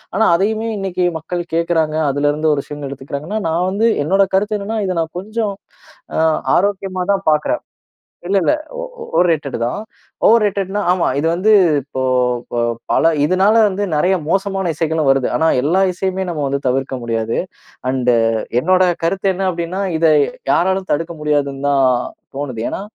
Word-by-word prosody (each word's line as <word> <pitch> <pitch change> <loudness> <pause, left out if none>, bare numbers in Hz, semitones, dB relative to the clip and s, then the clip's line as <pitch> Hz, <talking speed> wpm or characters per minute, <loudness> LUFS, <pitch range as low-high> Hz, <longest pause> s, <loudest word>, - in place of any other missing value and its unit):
ஆனா 220 +3 +3
அதையுமே 220 +3 0
இன்னைக்கு 185 -2 -1
மக்கள் 175 +2 -4
கேட்கிறாங்க. 165 -2 +1 0.2
அதுலருந்து 145 +2 +1
ஒரு 140 -1 -2
விஷயங்கள் 145 -2 -7
எடுத்துக்கிறாங்கன்னா 140 +9 -5
நான் 170 +3 0
வந்து 210 +4 +1 0.2
என்னோட 195 +5 +3
கருத்து 210 +2 +1
என்னன்னா, 220 +3 -3
இதை 185 - -1
நான் 160 0 -5
கொஞ்சம் 215 +1 -3 0.7
அ - - +2 0.4
ஆரோக்கியமா 190 -1 0
தான் 195 0 -2
பார்க்குறேன். 150 -1 0 0.6
இல்லல்ல. 195 - +2 0.5
ஓ - - -6
ஓவர் 180 - +5
ரேட்டடு 145 -6 -1
தான். 120 +11 -2 0.5
ஓவர்ரேட்டடுன்னா 205 -3 +2
ஆமா. 180 -2 +1
இது 150 - 0
வந்து 190 +6 +2 0.3
இப்போ 130 0 -6 0.5
ப - - -4 0.4
பல, 165 - +4
இதனால 190 +6 +3
வந்து 200 0 -2
நெறைய 180 +6 +2
மோசமான 195 0 0
இசைகளும் 160 -2 0
வருது. 135 -2 +2
ஆனா 160 - +2 0.2
எல்லா 170 +6 +2
இசையுமே 190 +1 -2
நம்ம 155 -4 -3
வந்து 140 0 -1
தவிர்க்க 130 +1 0
முடியாது. 115 -1 -2 0.5
அண்டு 125 -2 +2 0.5
என்னோட 185 +4 +3 0.2
கருத்து 190 +4 0
என்ன 190 +1 -2
அப்படீன்னா, 170 +2 -4 0.2
இத 165 - +2 0.5
யாராலையும் 190 +1 +1
தடுக்க 165 +3 -2
முடியாதுந்தான் 140 -2 +1 0.5
தோணுது. 130 -6 -4
ஏன்னா - - -4
170 Hz, 150 wpm, -18 LUFS, 145-195 Hz, 0.7 s, ஓவர்